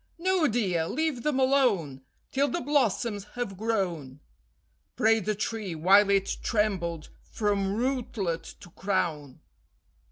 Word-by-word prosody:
"No, 365 -2 +2
dear, 190 -9 0
leave 310 - -1
them 280 0 0
alone 235 - +2 0.3
Till 275 +2 +2
the 345 - -2
blossoms 235 - 0
have 245 -6 -3
grown," 180 - -2 0.8
Prayed 220 -2 +3
the 215 - 0
tree, 210 -4 -3
while 195 +5 +5
it 195 -1 +1
trembled 185 -8 -1
from 200 -2 -1
rootlet 225 -9 -2
to 175 - -13
crown. 160 -9 -2
205 Hz, 120 wpm, -27 LUFS, 180-245 Hz, 0.8 s, while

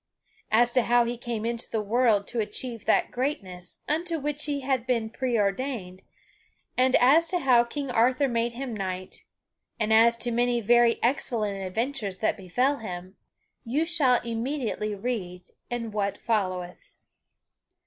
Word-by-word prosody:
As 240 +2 +4
to 255 - +4
how 240 0 +3
he 240 +1 -2
came 235 -2 -4
into 235 0 -3
the 220 - -1
world 215 -1 +2
to 235 - -3
achieve 225 +2 -4
that - - +2
greatness 190 -10 -4
unto 330 +2 -1
which 295 0 -3
he 285 -1 -2
had 260 -2 -1
been 230 -3 0
preordained, 220 -5 -1 0.7
and 255 +1 +3
as 295 +7 +5
to 360 - 0
how 255 -7 +4
King 275 +2 -5
Arthur 250 +4 +3
made 235 -1 -1
him 255 0 -5
knight, 185 -2 -5 0.5
and 220 0 +1
as 230 +1 +6
to 240 +1 -2
many 240 +1 +1
very 235 +1 +4
excellent 220 -6 0
adventures 215 0 -2
that 215 - 0
befell 245 +9 0
him, 185 -3 -7 0.5
you 270 +7 0
shall 275 -7 +3
immediately 230 -2 -2
read 195 -5 -4 0.3
in 235 -2 -3
what 200 -1 -1
followeth. 185 -5 -2
235 Hz, 150 wpm, -27 LUFS, 210-255 Hz, 0.7 s, as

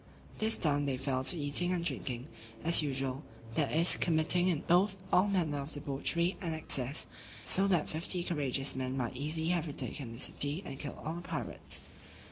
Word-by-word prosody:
This 220 +1 +3
done, 145 -3 +2
they 135 -2 -1
fell 130 -1 -2
to 180 - +5
eating 150 +4 +2
and 175 -2 -1
drinking, 125 -7 -3 0.4
as 170 0 +6
usual; 135 -2 -3 0.3
that 145 +3 0
is, 165 +3 +5
committing 170 +2 +3
in 170 -5 0
both 190 +3 +2 0.2
all 185 +3 +5
manner 170 -7 0
of 140 - -7
debauchery 150 +5 -1
and 165 -3 -2
excess, 140 -2 -1 0.4
so 195 +1 +4
that 175 -6 +1
fifty 175 +2 +2
courageous 140 -5 -1
men 130 0 -3
might 125 -1 -3
easily 155 +4 -1
have 175 -2 0
retaken 140 -3 -4
the 115 - -9
city, 145 +7 0
and 135 -3 -7
killed 145 - -6
all 160 - -2
the 170 - -6
pirates. 170 -3 -5
155 Hz, 180 wpm, -32 LUFS, 135-175 Hz, 0.4 s, as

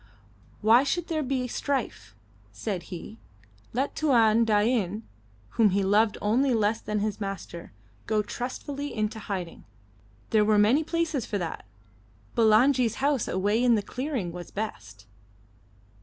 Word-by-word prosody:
Why 225 +4 +6
should 340 +4 -2
there 315 -2 0
be 260 -2 -1
strife? 275 +2 -3 0.4
said 190 -6 -5
he. 185 +5 -8 0.5
Let 265 +4 -1
Tuan 230 -6 +4
Dain, 215 -1 +1 0.5
whom 220 - +3
he 195 +1 +1
loved 210 +3 +3
only 245 +5 +2
less 215 +1 +1
than 210 -1 -2
his 215 0 -2
master, 195 -3 -6 0.4
go 215 -1 +1
trustfully 280 +5 -5
into 215 0 -2
hiding. 190 -5 -5 0.7
There 215 -1 +4
were 210 0 +3
many 225 +9 +4
places 325 -6 -1
for 210 - -2
that. 170 -4 -5 0.7
Bulangi's 230 +1 +4
house 275 -3 0
away 205 +5 +1
in 240 -2 +5
the 210 - -1
clearing 255 - -3
was 175 0 -8
best. 110 - -6
220 Hz, 135 wpm, -27 LUFS, 205-255 Hz, 0.7 s, Why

